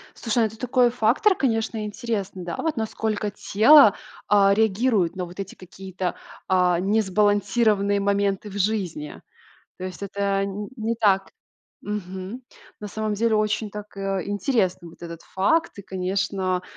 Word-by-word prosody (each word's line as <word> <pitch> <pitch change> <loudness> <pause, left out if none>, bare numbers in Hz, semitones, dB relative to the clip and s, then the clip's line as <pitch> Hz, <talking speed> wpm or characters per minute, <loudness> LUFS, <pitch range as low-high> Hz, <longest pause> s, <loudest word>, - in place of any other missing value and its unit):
Слушай, 230 0 -1
ну, - - +4
это 220 +1 -9
такой 250 -1 +2
фактор, 250 - +3
конечно, 225 -4 -1
интересный, 205 -4 -4
да, 170 - -4
вот 320 -4 -2
насколько 215 -1 -2
тело, 215 +4 +6 0.3
а, 200 -1 +5
реагирует 215 -3 +1
на 185 - -2
вот 175 +2 -12
эти 195 -1 -6
какие-то, 185 0 -6 0.3
а, 180 -2 +3
несбалансированные 205 +1 +2
моменты 200 0 0
в 205 - -6
жизни. 185 -7 -2 0.6
То 185 - -6
есть 185 +1 -7
это 200 0 -1
н 200 +1 -5
не 225 +1 -1
так 195 -4 +2 0.5
мгм. 195 +3 -6 0.4
На 210 - -6
самом 215 +1 -3
деле 225 +2 +1
очень 215 0 0
так, 210 0 -9
э, 195 -1 -1
интересно 200 -4 0
вот 165 - -17
этот 170 -1 -7
факт. 320 - +1
И, - - -7
конечно, 190 -1 -2
205 Hz, 145 wpm, -24 LUFS, 190-220 Hz, 0.6 s, тело